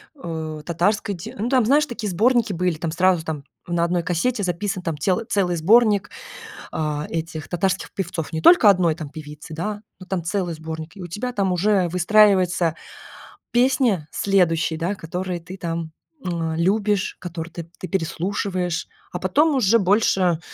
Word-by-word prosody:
э, 160 - -5
татарской 200 +5 0
те 170 - -9
Ну 225 +4 -2
там, 255 -4 +3
знаешь, 290 +5 +4
такие 225 -6 -4
сборники 230 +3 +2
были, 180 -1 0
там 160 +1 -3
сразу 175 0 +2
там 150 -4 -4 0.2
на 170 -1 0
одной 175 0 +1
кассете 200 +7 0
записан 185 +2 -2
там 165 -3 -2
тел 185 +8 0
целый 185 -7 +1
сборник, 205 +3 +4 0.6
а, 150 -1 -2
этих 160 -2 -4
татарских 185 +2 -1
певцов, 175 -4 -4
не 160 - -3
только 235 - +7
1 175 -5 +3
там 155 -4 -7
певицы, 150 +1 -10
да, 205 +6 -4 0.2
но 185 - -10
там 185 -3 -3
целый 180 -1 -1
сборник, 160 +2 -7
и 195 - -10
у 175 - -6
тебя 245 +8 -4
там 195 -3 +1
уже 185 0 +2
выстраивается 180 -2 +3 0.8
песня 240 - +2
следующие, 170 -5 +1
да, 180 +5 -1
которые 180 +1 -4
ты 180 +3 -9
там, 165 -2 -4 0.3
эм, 165 -2 -2
любишь, 200 +3 +1
которые 170 -2 -6
ты 165 -1 -7
ты 185 - -5
переслушиваешь, 180 0 -2 0.2
а 180 - -4
потом 290 - +2
уже 230 -3 +4
больше 190 -4 +2
180 Hz, 165 wpm, -22 LUFS, 165-205 Hz, 0.8 s, только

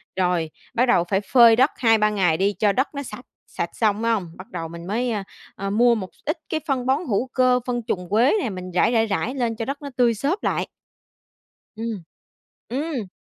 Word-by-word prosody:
rồi, 180 -3 0 0.2
bắt 245 +1 +3
đầu 240 -9 +3
phải 195 0 +1
phơi 235 +1 +6
đất 260 +5 +4
2-3 225 -3 +4
ngày 185 -6 +1
đi 195 +3 +1
cho 210 -2 +4
đất 260 +7 +1
nó 280 - -3
sạch, 245 -1 -9 0.2
sạch 170 - -4
xong 215 -2 +1
phải 230 0 +1
hông? 200 -6 -1
Bắt 185 - -10
đầu 165 -2 -4
mình 170 +1 -9
mới, 240 +5 -1
a, 210 -3 -2 0.3
a, 195 0 -4
mua 235 +4 +4
một 190 -4 -5
x - - -29
ít 310 +4 -1
cái 315 - -1
phân 260 -3 0
bón 265 +1 +2
hữu 235 +2 0
cơ, 255 -1 +3
phân 240 -1 -1
trùn 180 -6 -2
quế 230 +7 +4
nè, 245 - -1
mình 185 -2 -7
rải, 180 +6 +3
rải, 225 -2 +3
rải 225 +4 -2
lên 240 -4 -1
cho 225 - -4
đất 280 +3 -4
nó 285 - -6
tươi 240 -2 +4
xốp 290 - -2
lại. - - 0 1.1
Ừm. 220 -4 -4 0.7
Ừm! 270 -4 -3
225 Hz, 225 wpm, -23 LUFS, 195-250 Hz, 1.1 s, phơi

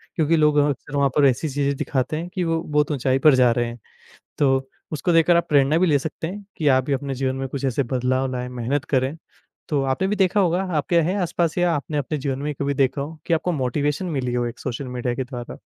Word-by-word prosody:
क्योंकि 165 -1 +2
लोग 150 -1 +3
अह 145 0 +4
अक्सर 145 +1 -5
वहाँ 140 -1 +3
पर 145 - +5
ऐसी 135 +4 +2
चीज़ें 140 0 0
दिखाते 130 +3 -1
हैं 165 +2 -4
कि 185 -2 -1
वो 165 -1 0
बहुत 150 0 0
ऊँचाई 135 -1 +1
पर 145 -1 +6
जा 125 -2 +5
रहे 120 +1 +1
हैं। 120 +1 -8 0.6
तो 135 -2 +2 0.2
उसको 160 +3 -1
देखकर 165 +1 +5
आप 170 - 0
प्रेरणा 145 +1 +4
भी 180 +1 +3
ले 145 -3 +3
सकते 160 +2 -5
हैं 200 +4 -7
कि 155 - 0
आप 130 -2 +4
भी 140 - 0
अपने 135 0 -3
जीवन 130 0 -1
में 135 0 -3
कुछ 140 +1 -4
ऐसे 135 +1 +1
बदलाव 130 +1 0
लाएँ, 125 0 -4
मेहनत 125 +4 -2
करें। 130 +1 0 0.5
तो 145 -3 +1
आपने 135 +8 0
भी 210 - 0
देखा 195 0 +2
होगा, 180 -1 +2 0.2
आपके 170 +4 +2
है 175 +5 0
आसपास 170 -1 -1
या 175 -1 +2
आपने 150 +1 -3
अपने 145 +2 -2
जीवन 135 -1 -3
में 145 - -4
ही - - -2
कभी 140 0 0
देखा 135 0 +1
हो 155 +3 -6
कि 170 - +1
आपको 170 +2 +1
मोटिवेशन 145 +3 -1
मिली 130 -8 -2
हो 120 0 0
एक 120 0 -6
सोशल 130 +1 -4
मीडिया 125 0 -2
के 130 - -2
द्वारा? 125 -2 -8
140 Hz, 250 wpm, -22 LUFS, 130-160 Hz, 0.6 s, पर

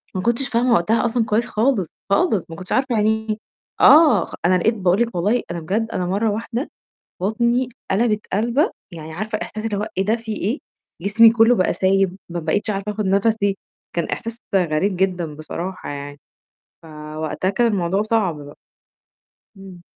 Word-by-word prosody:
ما 185 - -1
كنتش 240 +5 0
فاهمة 240 +1 +2
وقتها 220 +8 +2
أصلًا 235 -1 +1
كويس 225 +3 +1
خالص، 220 - +1 0.2
خالص 215 - +2
ما 165 - -7
كنتش 185 +1 -10
عارفة 260 -3 +1
يعني 220 +1 +1
إيه، 215 - 0 0.4
آه، 310 -1 +7
خ - - -15
أنا 185 +1 +4
لقيت 220 +6 +2
باقول 190 0 +1
لِك 235 -3 -1
والله 205 +8 +1
أنا 170 - -3
بجد 205 +8 -1
أنا 180 - -1
مَرّة 205 +4 0
واحدة 230 +6 -3 0.5
بطني 235 +5 +1 0.2
قلَبَت 210 +1 +2
قلَبَه، 240 - +2 0.2
يعني 160 -1 -8
عارفة 215 +5 -3
إحساس 215 0 -6
اللي 215 -2 -1
هو 210 +2 -2
إيه 190 - +2
ده 220 +4 +2
في 225 -1 -6
إيه، 225 - -1 0.4
جسمي 225 +3 +6
كلّه 230 +1 +5
بقى 185 - +2
سايب 190 -1 +1
ما 175 0 -4
بقيتش 205 +6 -1
عارفة 200 +1 -3
آخُد 210 -1 -3
نَفَسي، 200 +1 +2 0.4
كان 170 - +1
إحساس 230 +7 -5 0.2
غريب 180 +1 +1
جدًا 180 -5 -1
بصراحة 175 +4 -6
يعني، 145 0 -7 0.6
فوقتها 155 +3 -4
كان 235 +4 +2
الموضوع 195 -2 +1
صعب 215 -7 0
بقى. 145 0 -11 1.0
إمم. 190 -2 -12
205 Hz, 175 wpm, -21 LUFS, 180-230 Hz, 1.0 s, آه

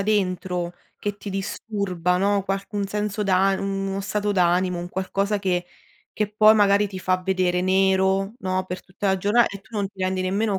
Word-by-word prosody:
dentro 185 -3 -1 0.3
che 205 -1 -4
ti 205 - -8
disturba, 195 -2 -2
no, 200 +1 +2
qualc 195 +2 -4
un 205 -1 -1
senso 210 +1 -2
d'an 195 0 +3
mhmm, 195 0 -2
uno 195 0 -2
stato 205 +1 -1
d'animo, 180 -1 +2
un 175 - -5
qualcosa 195 +2 -1
che 180 -3 -1 0.5
che 210 -1 -1
poi 215 +1 +6
magari 205 -1 +4
ti 190 -2 -7
fa 185 0 +1
vedere 180 -1 +1
nero, 190 +1 +2
no, 185 -4 -1
per 180 0 -6
tutta 195 +2 -4
la 190 - +3
giorna 210 +5 +4
e 200 - -5
tu 215 +3 -10
non 200 -1 0
ti 195 -1 -15
rendi 185 0 0
nemmeno 200 +2 0
195 Hz, 195 wpm, -23 LUFS, 185-205 Hz, 0.5 s, poi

